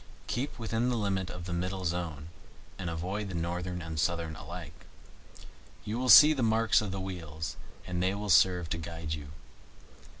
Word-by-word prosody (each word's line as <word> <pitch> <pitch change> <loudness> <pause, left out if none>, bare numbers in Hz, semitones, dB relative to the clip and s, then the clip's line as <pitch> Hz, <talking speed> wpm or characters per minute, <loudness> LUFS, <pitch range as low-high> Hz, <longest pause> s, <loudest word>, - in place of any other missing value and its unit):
Keep 135 - -3
within 115 +1 -1
the 120 - 0
limit 95 -3 -1
of 90 -1 -7
the 90 - -4
middle 90 +2 -3
zone, 85 -3 -3 0.5
and 90 -3 -3
avoid 95 +5 -3
the 95 - -5
northern 90 +1 -3
and 80 -1 -6
the - - 0
southern 85 -1 -1
alike. 80 0 -9 1.0
You 110 +3 -3
will 130 0 -1
see 150 +4 +10
the 135 - -2
marks 115 -1 +3
of 105 - -3
the 95 - -4
wheels, 80 -4 -5 0.3
and 90 -1 -3
they 95 +2 +1
will 105 0 -2
serve 90 0 +5
to 85 - -1
guide 80 -1 -5
you. 75 -2 -6
90 Hz, 180 wpm, -30 LUFS, 85-105 Hz, 1.0 s, see